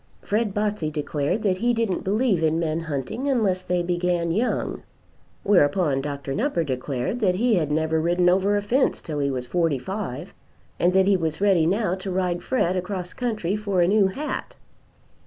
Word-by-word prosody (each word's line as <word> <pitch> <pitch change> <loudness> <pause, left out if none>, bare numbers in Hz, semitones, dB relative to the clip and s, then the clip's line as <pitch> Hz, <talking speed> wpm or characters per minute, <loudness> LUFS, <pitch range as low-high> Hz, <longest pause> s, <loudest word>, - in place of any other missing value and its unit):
Fred 215 0 0
Botsey 205 -5 -1
declared 150 +6 -2
that 190 -3 +1
he 240 +4 +1
didn't 225 -5 -1
believe 205 -2 +1
in 160 0 +2
men 160 -1 -1
hunting 165 - -3
unless 205 -8 +1
they 180 -1 -1
began 175 -1 0
young. 225 +8 -1 0.6
Whereupon 150 -6 +3
Dr. 140 -1 -4
Nupper 215 - 0
declared 130 - -3
that 190 -5 +2
he 235 +4 +2
had 165 -7 +1
never 160 +1 +1
ridden 175 +2 +2
over 195 +3 +3
a 205 - -2
fence 255 +6 +1
till 150 -2 -5
he 140 -1 +1
was 130 -2 -3
forty 165 +1 +1
five, 175 0 -5 0.5
and 175 - +3
that 190 0 +4
he 200 0 +4
was 160 -4 -2
ready 190 -5 +3
now 195 0 +1
to 190 +1 -5
ride 180 -2 -1
Fred 185 -8 0
across 185 -1 -4
country 215 -7 -2
for 200 -4 0
a 170 - +4
new 200 0 +4
hat. 285 +11 -5
180 Hz, 180 wpm, -24 LUFS, 160-205 Hz, 0.6 s, that